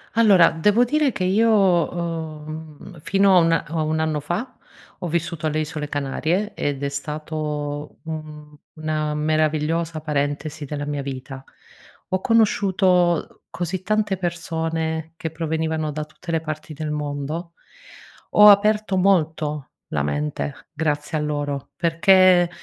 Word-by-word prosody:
Allora 200 Hz, -7 st, +6 dB
devo 210 Hz, +8 st, +3 dB
dire 290 Hz, +1 st, +1 dB
che 185 Hz, -, -3 dB
io 215 Hz, +5 st, +3 dB
ho, 190 Hz, -6 st, +3 dB, 0.5 s
uhm, 155 Hz, 0 st, -8 dB
mhmm, 175 Hz, -5 st, -12 dB
fino 195 Hz, +4 st, +3 dB
a -, -, +8 dB
una 165 Hz, -1 st, +2 dB
a 160 Hz, +1 st, -3 dB
un 155 Hz, +1 st, 0 dB
anno 155 Hz, -1 st, 0 dB
fa, 175 Hz, -, -4 dB, 0.4 s
ho 180 Hz, -, -4 dB
vissuto 170 Hz, -1 st, -2 dB
alle 155 Hz, 0 st, 0 dB
isole 150 Hz, -1 st, -4 dB
Canarie 155 Hz, +9 st, -1 dB
ed 145 Hz, -1 st, -3 dB
è 140 Hz, -, 0 dB
stato 150 Hz, 0 st, -4 dB
un 155 Hz, -2 st, -8 dB, 0.2 s
una 155 Hz, -1 st, -2 dB
meravigliosa 155 Hz, +1 st, 0 dB
parentesi 150 Hz, 0 st, -2 dB
della 145 Hz, +1 st, -4 dB
mia 145 Hz, -1 st, -3 dB
vita. 135 Hz, 0 st, -7 dB, 0.7 s
Ho 185 Hz, -, 0 dB
conosciuto 190 Hz, -5 st, +2 dB
così 175 Hz, +1 st, -4 dB
tante 210 Hz, -1 st, 0 dB
persone 165 Hz, -2 st, -3 dB
che 165 Hz, -, -4 dB
provenivano 160 Hz, -1 st, -2 dB
da 150 Hz, +1 st, -3 dB
tutte 155 Hz, +3 st, -9 dB
le 165 Hz, -1 st, +1 dB
parti 155 Hz, 0 st, -6 dB
del 155 Hz, +1 st, -4 dB
mondo. 150 Hz, +3 st, -4 dB, 0.8 s
Ho 210 Hz, 0 st, +8 dB
aperto 210 Hz, -1 st, +4 dB
molto 160 Hz, -6 st, +1 dB, 0.2 s
la 70 Hz, -1 st, -1 dB
mente 145 Hz, -, -3 dB
grazie 150 Hz, 0 st, -1 dB
a -, -, -1 dB
loro 145 Hz, -2 st, -3 dB
perché, 175 Hz, +1 st, +5 dB
160 Hz, 140 wpm, -22 LUFS, 150-180 Hz, 0.8 s, a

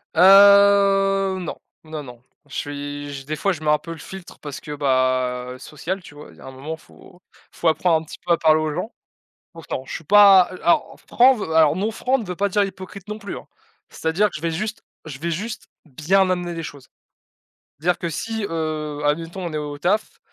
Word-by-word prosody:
Heu, 195 Hz, 0 st, +6 dB
non, 175 Hz, -, -5 dB, 0.3 s
non, 155 Hz, -1 st, -6 dB
non. 125 Hz, -3 st, -12 dB, 0.3 s
Je 140 Hz, -, -15 dB
suis 145 Hz, 0 st, -5 dB
je 135 Hz, -1 st, -8 dB
des 155 Hz, +2 st, -3 dB
fois, 195 Hz, -, +1 dB
je 160 Hz, -, -9 dB
mets 155 Hz, -, -1 dB
un 150 Hz, -, +4 dB
peu 165 Hz, +3 st, -10 dB
le 165 Hz, -, -7 dB
filtre 190 Hz, +3 st, -11 dB
parce 145 Hz, -3 st, -7 dB
que, 150 Hz, -, -7 dB
bah, 130 Hz, -2 st, 0 dB
social, 170 Hz, +8 st, -5 dB
tu 145 Hz, -, -14 dB
vois, 145 Hz, -11 st, -12 dB
il 80 Hz, -, -20 dB
y -, -, -17 dB
a -, -, -12 dB
un 130 Hz, -, -8 dB
moment 140 Hz, +5 st, -6 dB
faut 175 Hz, +2 st, -19 dB, 0.3 s
faut 170 Hz, -, -2 dB
apprendre 160 Hz, +1 st, +2 dB
un -, -, -10 dB
petit 155 Hz, -, -11 dB
peu 175 Hz, -, +3 dB
à -, -, +2 dB
parler 155 Hz, -1 st, +4 dB
aux 155 Hz, -1 st, -2 dB
gens. 220 Hz, -, -4 dB, 0.6 s
Pourtant 160 Hz, -5 st, -6 dB
je -, -, -8 dB
suis -, -, -6 dB
pas, 195 Hz, +1 st, +7 dB
heu, 185 Hz, -, -9 dB
a -, -, -11 dB
alors 170 Hz, -, +1 dB
franc 255 Hz, 0 st, +5 dB
alors 160 Hz, -2 st, +5 dB
non 205 Hz, +5 st, -1 dB
franc 255 Hz, +4 st, 0 dB
ne 230 Hz, -, -6 dB
veut 180 Hz, -1 st, -5 dB
pas 200 Hz, +3 st, 0 dB
dire 205 Hz, +2 st, +2 dB
hypocrite 190 Hz, 0 st, -8 dB
non 210 Hz, +1 st, -6 dB
plus 205 Hz, -1 st, -6 dB
hein, -, -, -11 dB, 0.4 s
c'est-à-dire 160 Hz, +6 st, 0 dB
que -, -, -25 dB
je 155 Hz, -, -6 dB
vais 165 Hz, -, -1 dB
juste 215 Hz, +7 st, -4 dB, 0.2 s
je 145 Hz, -3 st, -8 dB
vais 170 Hz, +3 st, -3 dB
juste 210 Hz, +7 st, -5 dB, 0.2 s
bien 170 Hz, +7 st, +1 dB
amener 175 Hz, -1 st, -2 dB
les 165 Hz, -, -5 dB
choses. 140 Hz, -3 st, -10 dB, 0.9 s
Dire 175 Hz, +3 st, +1 dB
que 170 Hz, -, -3 dB
si, 220 Hz, +6 st, -4 dB
heu, 155 Hz, -3 st, -3 dB
admettons 165 Hz, +5 st, -2 dB
on 165 Hz, -, -5 dB
est -, -, -1 dB
au 145 Hz, -1 st, -5 dB
taf 190 Hz, +8 st, -1 dB
165 Hz, 225 wpm, -22 LUFS, 150-195 Hz, 0.9 s, pas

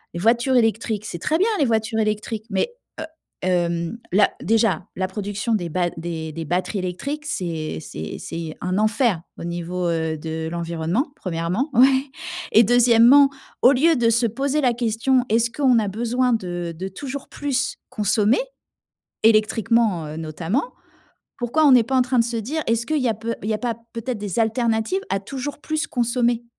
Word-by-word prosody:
Les -, -, -3 dB
voitures 235 Hz, +6 st, +2 dB
électriques, 225 Hz, -2 st, +1 dB
c'est 175 Hz, -5 st, -5 dB
très 310 Hz, -, +1 dB
bien 405 Hz, +6 st, +2 dB
les 285 Hz, -, +4 dB
voitures 220 Hz, -1 st, 0 dB
électriques 215 Hz, 0 st, -2 dB
mais, 195 Hz, -, 0 dB, 0.3 s
heu, 315 Hz, -, -3 dB, 0.4 s
hem, 170 Hz, +1 st, 0 dB
la 200 Hz, +2 st, +4 dB
déjà 220 Hz, -6 st, +1 dB
la 185 Hz, -, -1 dB
production 205 Hz, +3 st, -3 dB
des 175 Hz, -5 st, -2 dB
batt 175 Hz, +2 st, -1 dB
des 165 Hz, -1 st, -5 dB
des 165 Hz, +1 st, -5 dB
batteries 180 Hz, +5 st, -1 dB
électriques 275 Hz, +12 st, -4 dB
c'est 165 Hz, -, -3 dB
c'est 80 Hz, 0 st, -7 dB
c'est 165 Hz, -2 st, -6 dB
un 180 Hz, +1 st, -1 dB
enfer 215 Hz, -4 st, +2 dB, 0.2 s
au -, -, -6 dB
niveau, 175 Hz, +1 st, -3 dB
heu, 160 Hz, -1 st, -1 dB
de 160 Hz, +1 st, -4 dB
l'environnement 170 Hz, -, -2 dB
1°. 185 Hz, -, -2 dB
Ouais 265 Hz, +2 st, +5 dB, 0.5 s
et 225 Hz, -, +7 dB
2°, 245 Hz, +4 st, +6 dB, 0.3 s
au 250 Hz, -, +7 dB
lieu 315 Hz, +5 st, +4 dB
de 235 Hz, -3 st, +2 dB
se 235 Hz, +1 st, +3 dB
poser 275 Hz, +6 st, -1 dB
la 250 Hz, -3 st, +3 dB
question, 240 Hz, +2 st, +1 dB
est-ce 230 Hz, +2 st, +2 dB
qu'on 260 Hz, -3 st, +3 dB
a 210 Hz, -, -1 dB
besoin 240 Hz, +4 st, 0 dB
de 175 Hz, -5 st, -3 dB
de 190 Hz, +3 st, -4 dB
toujours 270 Hz, +7 st, -7 dB
plus 280 Hz, -1 st, -2 dB
consommer 210 Hz, +1 st, +2 dB, 0.8 s
électriquement, 220 Hz, -4 st, +3 dB
heu, 150 Hz, +1 st, -7 dB
notamment, 165 Hz, -, -2 dB, 0.7 s
pourquoi 260 Hz, +5 st, +1 dB
on 275 Hz, -, +7 dB
n'est 245 Hz, -, +7 dB
pas 265 Hz, +3 st, -1 dB
en -, -, +5 dB
train 250 Hz, 0 st, 0 dB
de 230 Hz, -, +4 dB
se 235 Hz, 0 st, -3 dB
dire, 295 Hz, +9 st, -3 dB
est-ce 230 Hz, +1 st, 0 dB
qu'il 310 Hz, -3 st, 0 dB
y 255 Hz, -, +2 dB
a 225 Hz, -, +1 dB
peu 230 Hz, +2 st, -4 dB
il 210 Hz, -, -3 dB
y -, -, +2 dB
a -, -, -2 dB
pas 240 Hz, -1 st, -2 dB, 0.2 s
peut-être 235 Hz, +2 st, -3 dB
des 205 Hz, 0 st, -4 dB
alternatives 225 Hz, -, 0 dB
à 195 Hz, -, 0 dB
toujours 270 Hz, +7 st, -6 dB
plus 310 Hz, +1 st, -2 dB
consommer 240 Hz, -2 st, 0 dB
225 Hz, 180 wpm, -22 LUFS, 180-250 Hz, 0.8 s, et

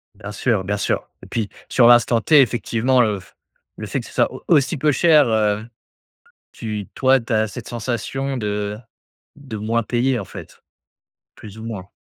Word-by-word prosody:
Bien 105 Hz, +1 st, -8 dB
sûr, 105 Hz, -1 st, 0 dB
bien 100 Hz, +2 st, -1 dB
sûr -, -, -1 dB, 0.2 s
et -, -, -11 dB
puis 110 Hz, -3 st, -3 dB, 0.2 s
sur 120 Hz, -3 st, +5 dB
l'instant 120 Hz, -1 st, +5 dB
t 150 Hz, +4 st, +6 dB
effectivement, 125 Hz, +1 st, +1 dB
heu, 105 Hz, -4 st, +1 dB
f 95 Hz, -, -19 dB, 0.4 s
le -, -, -6 dB
fait -, -, -2 dB
que -, -, -12 dB
ce -, -, -13 dB
soit -, -, +2 dB
au -, -, -10 dB
aussi 145 Hz, +3 st, +3 dB
peu 150 Hz, +2 st, +2 dB
cher, 150 Hz, -2 st, +4 dB
heu, 110 Hz, -1 st, +1 dB, 0.9 s
tu 105 Hz, -3 st, -5 dB
toi 130 Hz, 0 st, +3 dB
tu 115 Hz, -, -14 dB
as 110 Hz, 0 st, +2 dB
cette 110 Hz, +3 st, -8 dB
sensation 125 Hz, +3 st, -3 dB
de 105 Hz, -1 st, -3 dB, 0.6 s
de 140 Hz, -6 st, -8 dB
moins 115 Hz, +3 st, -1 dB
payer, 125 Hz, +2 st, 0 dB
en 100 Hz, -, -6 dB
fait, -, -, -11 dB, 0.7 s
plus 110 Hz, 0 st, -12 dB
ou 110 Hz, -, -8 dB
moins. 105 Hz, -5 st, -6 dB
115 Hz, 185 wpm, -21 LUFS, 105-130 Hz, 0.9 s, t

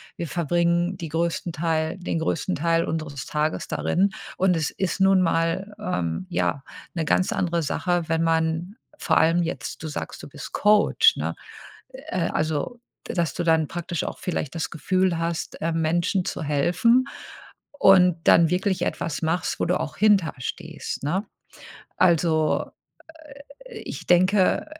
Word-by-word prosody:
wir 170 Hz, -, -4 dB
verbringen 170 Hz, +2 st, +1 dB
die 165 Hz, -3 st, -6 dB
größten 170 Hz, +2 st, -1 dB
Teil 160 Hz, +1 st, -1 dB
den 175 Hz, -2 st, -3 dB
größten 165 Hz, +3 st, -1 dB
Teil 165 Hz, +2 st, +1 dB
unseres 155 Hz, -5 st, -4 dB
Tages 150 Hz, +1 st, -1 dB
darin 195 Hz, +2 st, +1 dB, 0.3 s
und 185 Hz, -1 st, +3 dB
es 160 Hz, -2 st, 0 dB
ist 190 Hz, 0 st, -2 dB
nun 190 Hz, -1 st, +5 dB
mal, 170 Hz, +4 st, 0 dB
ähm, 90 Hz, -, -2 dB
ja, 90 Hz, +11 st, -1 dB, 0.3 s
'ne 165 Hz, -, -1 dB
ganz 185 Hz, +4 st, +1 dB
andere 170 Hz, -2 st, 0 dB
Sache, 175 Hz, +2 st, -1 dB
wenn 165 Hz, 0 st, +1 dB
man 165 Hz, +3 st, 0 dB, 0.2 s
vor -, -, +1 dB
allem 170 Hz, +2 st, +4 dB
jetzt 155 Hz, -4 st, -5 dB
du 160 Hz, -, -4 dB
sagst, 150 Hz, -, -6 dB
du -, -, -9 dB
bist -, -, -9 dB
Coach, 210 Hz, 0 st, +4 dB
ne? -, -, -3 dB, 0.5 s
Äh, 185 Hz, -, -3 dB
also, 155 Hz, -, -2 dB, 0.3 s
dass 170 Hz, -5 st, -1 dB
du -, -, -3 dB
dann 160 Hz, -2 st, +3 dB
praktisch 170 Hz, 0 st, -4 dB
auch -, -, -6 dB
vielleicht 165 Hz, -4 st, -3 dB
das 165 Hz, -, -2 dB
Gefühl 185 Hz, +2 st, 0 dB
hast, 165 Hz, 0 st, -3 dB
äh, 165 Hz, -, 0 dB
Menschen 170 Hz, +4 st, +1 dB
zu 170 Hz, -, -4 dB
helfen 175 Hz, -, +3 dB, 0.7 s
und 180 Hz, -5 st, +6 dB
dann 165 Hz, -1 st, +6 dB
wirklich 190 Hz, +1 st, 0 dB
etwas 160 Hz, -, -3 dB
machst, 165 Hz, +2 st, -1 dB
wo -, -, +1 dB
du -, -, +1 dB
auch 150 Hz, -, -5 dB
hinter 200 Hz, -5 st, +3 dB
stehst, 160 Hz, +5 st, -5 dB
ne? 180 Hz, +9 st, -1 dB, 0.7 s
Also, 165 Hz, -3 st, +2 dB, 1.0 s
äh, -, -, -10 dB
ich -, -, -7 dB
denke, 185 Hz, +2 st, +3 dB
170 Hz, 150 wpm, -24 LUFS, 160-185 Hz, 1.0 s, und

